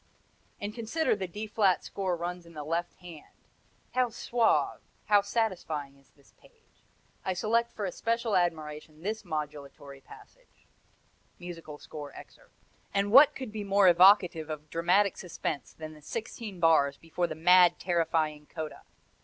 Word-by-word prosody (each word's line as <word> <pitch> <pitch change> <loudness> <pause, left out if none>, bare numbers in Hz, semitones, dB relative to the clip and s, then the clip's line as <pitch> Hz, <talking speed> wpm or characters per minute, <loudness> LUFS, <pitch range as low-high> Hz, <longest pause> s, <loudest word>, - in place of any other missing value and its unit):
And 205 +1 -5
consider 235 +6 0
the 190 -2 -4
D 210 +5 -6
flat 205 -3 +2
scale 195 -1 -4
runs 175 0 -5
in 170 - -15
the 150 - -5
left 170 +3 -2
hand; 170 -4 -12 0.6
how 255 -1 +2
suave, 235 0 +1 0.2
how 205 -1 +5
satisfying 175 -10 -2
is 140 0 -25
this 140 - -26
page. 465 -2 -26 0.4
I 190 - -1
select 230 +5 0
for 210 - -4
especial 230 +4 -1
admiration 155 -2 -2
this 220 +3 -2
modulatory 145 -4 -6
passage: - - -18 0.7
[Musical 165 -4 -9
score 145 -1 -9
excerpt] - - -15 0.4
And 200 +1 +1
what 275 +5 +8
could 260 -5 -6
be 215 -1 -5
more 200 -1 +4
evocative 180 -3 +5
of 155 0 -7
dramatic 180 +4 +2
suspense 155 -7 -5
than 155 -1 -9
the 155 - -15
sixteen 215 +2 -6
bars 150 -4 +4
before 170 +2 -2
the 155 - -6
mad, 180 +2 +6
terrifying 160 -4 -1
coda! 155 -2 -7
175 Hz, 145 wpm, -29 LUFS, 155-210 Hz, 0.7 s, what